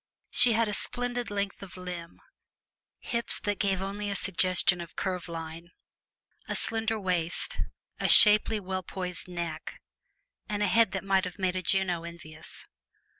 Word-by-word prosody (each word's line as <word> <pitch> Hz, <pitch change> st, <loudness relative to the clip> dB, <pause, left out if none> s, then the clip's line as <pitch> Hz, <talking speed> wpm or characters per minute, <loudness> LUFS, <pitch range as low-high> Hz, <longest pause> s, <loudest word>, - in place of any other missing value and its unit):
She 245 Hz, -1 st, +5 dB
had 225 Hz, 0 st, +2 dB
a 210 Hz, -, -3 dB
splendid 245 Hz, +2 st, -3 dB
length 200 Hz, 0 st, -3 dB
of 190 Hz, -2 st, -11 dB
limb, 180 Hz, -2 st, -8 dB, 0.8 s
hips 235 Hz, 0 st, 0 dB
that 205 Hz, -1 st, -2 dB
gave 195 Hz, -2 st, 0 dB
only 205 Hz, +1 st, -4 dB
a 200 Hz, -, -2 dB
suggestion 185 Hz, -1 st, +3 dB
of 170 Hz, -, -10 dB
curve 180 Hz, -3 st, -3 dB
line, 165 Hz, +1 st, -7 dB, 0.8 s
a -, -, -3 dB
slender 225 Hz, 0 st, -1 dB
waist, 180 Hz, -3 st, -2 dB, 0.4 s
a -, -, 0 dB
shapely, 215 Hz, +1 st, +8 dB
well 190 Hz, -1 st, -4 dB
poised 180 Hz, 0 st, -5 dB
neck, 170 Hz, -3 st, -6 dB, 0.7 s
and 210 Hz, 0 st, -1 dB
a -, -, +2 dB
head 225 Hz, +2 st, +3 dB
that 190 Hz, -, -3 dB
might 195 Hz, -1 st, +1 dB
have 180 Hz, +1 st, -7 dB
made 185 Hz, -2 st, -1 dB
a 185 Hz, -, -2 dB
Juno 180 Hz, -2 st, 0 dB
envious. 160 Hz, -2 st, -9 dB
190 Hz, 155 wpm, -28 LUFS, 175-205 Hz, 0.8 s, shapely